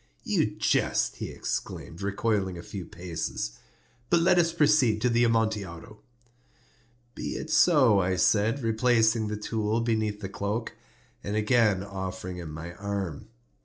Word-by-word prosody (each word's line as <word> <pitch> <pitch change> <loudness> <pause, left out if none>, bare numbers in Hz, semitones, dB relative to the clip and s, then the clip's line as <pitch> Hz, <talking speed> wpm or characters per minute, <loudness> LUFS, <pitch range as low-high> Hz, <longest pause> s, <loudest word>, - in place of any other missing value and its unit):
"You - - +1
jest," - - +1
he - - -5
exclaimed, 65 +7 -5
recoiling 100 -2 -1
a 85 - -8
few 95 -4 -7
paces. 85 -8 -5 0.5
"But 170 - +4
let 180 +1 +4
us 170 -1 +3
proceed 145 -9 +3
to 125 - +2
the 120 +1 +3
Amontillado." 110 -3 -1 1.1
"Be - - -5
it 155 - -5
so," 140 - +5
I 95 0 +1
said, 110 +7 +2
replacing 115 -1 +2
the 105 0 -3
tool 110 +1 -1
beneath 110 -3 -1
the 95 - -3
cloak, 100 +3 -3 0.5
and 100 - -3
again 105 -3 +3
offering 95 -2 -6
him 85 -3 -7
my 80 +3 -7
arm. 100 -6 -4
105 Hz, 140 wpm, -27 LUFS, 95-115 Hz, 1.1 s, so